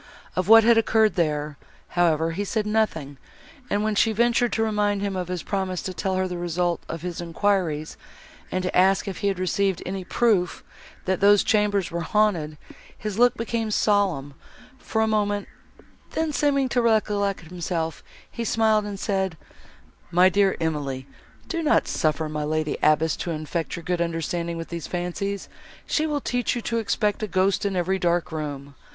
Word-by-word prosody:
Of 185 0 0
what 225 +1 +9
had 230 0 +6
occurred 220 -1 +3
there, 150 -4 -1 0.3
however, 165 -2 +2
he 195 +5 -2
said 215 +1 -1
nothing, 210 -10 -1 0.5
and, 205 +1 0
when 215 0 +1
she 220 +2 +3
ventured 235 +2 +2
to 225 - +1
remind 205 -2 0
him 200 -1 -2
of 180 -2 -3
his 180 -2 -4
promise 190 -2 -2
to 185 - -4
tell 190 +1 -2
her 185 0 0
the 180 -1 -5
result 175 0 -1
of 165 0 -5
his 175 -1 -4
enquiries, 170 -3 -1 0.5
and 185 - -1
to 185 - -2
ask 190 +2 +4
if 195 - -5
he 200 - 0
had 195 -2 0
received 190 0 0
any 190 0 -4
proof, 190 -2 +1 0.4
that 190 -1 0
those 205 0 +5
chambers 205 -3 +1
were 170 0 -2
haunted, 170 -5 +1 0.4
his 210 0 -4
look 245 0 +5
became 230 -1 -2
solemn, 195 -10 +1 0.5
for 220 -2 -1
a - - +1
moment, 205 -2 0 0.7
then, 320 -1 -1
seeming 280 -2 +2
to 245 0 +2
recollect 210 -3 +1
himself, 165 -1 -4 0.3
he 235 - -4
smiled, 220 -2 +2
and 200 -1 -5
said, 190 -5 -1 0.7
"My 180 +2 +5
dear 195 0 +2
Emily, 145 -5 -2 0.4
do 335 - -2
not 310 -1 +3
suffer 155 0 0
my 150 0 -3
lady 155 0 -1
abbess 155 +1 +3
to - - -4
infect 160 +1 -3
your 170 - -8
good 175 +1 -1
understanding 170 0 -2
with 165 - -6
these 170 -2 -5
fancies; 180 +3 -3 0.4
she 310 0 0
will 295 -2 -1
teach 245 -1 -1
you 240 - -2
to 230 -1 -1
expect 210 0 0
a 215 - -1
ghost 190 +2 +1
in 195 - -3
every 185 +2 0
dark 175 -1 0
room. 145 -3 -5
190 Hz, 180 wpm, -24 LUFS, 170-215 Hz, 0.7 s, what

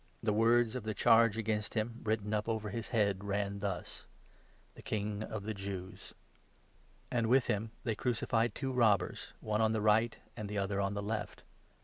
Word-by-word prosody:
The 110 -2 +2
words 115 +1 +4
of 125 - -3
the 110 0 -4
26 - - -4
charge 115 -2 +6
against 110 -1 -2
him, 115 +2 -1
written 110 -1 -1
up 105 +1 0
over 110 -2 -1
his 115 -1 -4
head, 100 -5 +1
ran 100 0 -1
thus 95 -3 -4 0.3
— - - -32
'THE - - -13
KING 105 -1 -2
OF 110 -1 -5
THE 110 +1 -3
JEWS.' 95 -2 -7 1.0
And 115 -2 +1
with 125 +2 +4
him 110 -1 -1
they 115 - 0
crucified 115 0 0
two 135 -2 -2
robbers, 115 -6 +2
one 110 0 0
on 110 0 +3
the 110 - +1
right, 110 +2 +4
27 - - -22
and 105 -1 -5
the 105 - -3
other 100 0 0
on 100 +1 -1
the 100 - -3
left. 105 0 -4
110 Hz, 200 wpm, -33 LUFS, 100-115 Hz, 1.0 s, charge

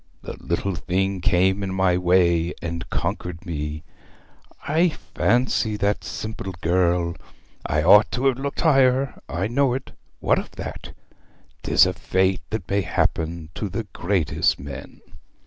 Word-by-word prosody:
The - - -6
little 90 +3 -1
thing 95 +3 -1
came 95 0 +2
in 95 -1 -3
my 95 -1 +3
way, 90 -1 +2
and 85 0 -5
conquered 90 0 -3
me. 75 -2 -4 0.8
I 165 +4 +3
fancy 120 -6 0
that 100 0 0
simple 110 -3 -5
girl! 85 0 +1 0.5
I 75 +1 +1
ought 105 +5 +7
to 125 +3 -1
have 135 -2 +2
looked 140 +1 -3
higher 135 -4 +3
I 85 +3 -1
know 125 +1 +2
it; 135 - -6 0.3
what - - +2
of - - -7
that? - - -7 0.7
'Tis - - +5
a - - 0
fate 95 -1 0
that 110 -5 -4
may 100 +1 +1
happen 80 -3 -1
to 105 +5 -4
the 115 +5 -3
greatest 90 -5 +1
men.' 70 -1 -9
95 Hz, 145 wpm, -23 LUFS, 85-110 Hz, 0.8 s, ought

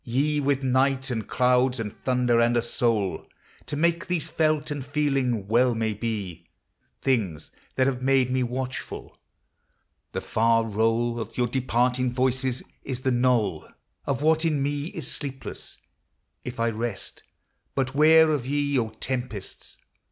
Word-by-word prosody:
ye 145 +5 0
With 140 -1 0
night, 130 +1 +2
and 110 -3 -3
clouds, 125 0 +2
and 105 -2 -4
thunder, 125 -2 +2
and 120 +1 +3
a - - +3
soul 115 -5 0 0.4
To - - -3
make 170 +5 +1
these 175 -4 -1
felt 155 -1 +1
and 145 -2 -3
feeling, 135 -7 0
well 120 +2 +3
may 110 -1 0
be 105 -5 -4 0.5
Things 100 - -1 0.2
that 130 - +3
have 130 -2 -1
made 130 -1 +3
me 130 0 +1
watchful; 130 +1 -4 1.0
the - - -2
far 115 0 +2
roll 115 +2 +1
Of 115 0 -6
your 125 - +2
departing 125 0 +1
voices 130 0 0 0.2
is 130 -2 -4
the 130 - +1
knoll 120 -9 +1 0.4
Of 140 +1 -1
what 160 +1 +3
in 150 -4 +1
me 145 0 -1
is 160 -4 -6
sleepless, 135 -2 -6 0.3
— - - -50
if 125 -1 -7
I 115 0 +2
rest. 115 -2 -5 0.5
But 130 -1 0
where 160 +2 +6
of 140 -5 -1
ye, 145 -1 +1
O 115 -2 -1
tempests 120 -2 -6
125 Hz, 150 wpm, -25 LUFS, 115-140 Hz, 1.0 s, where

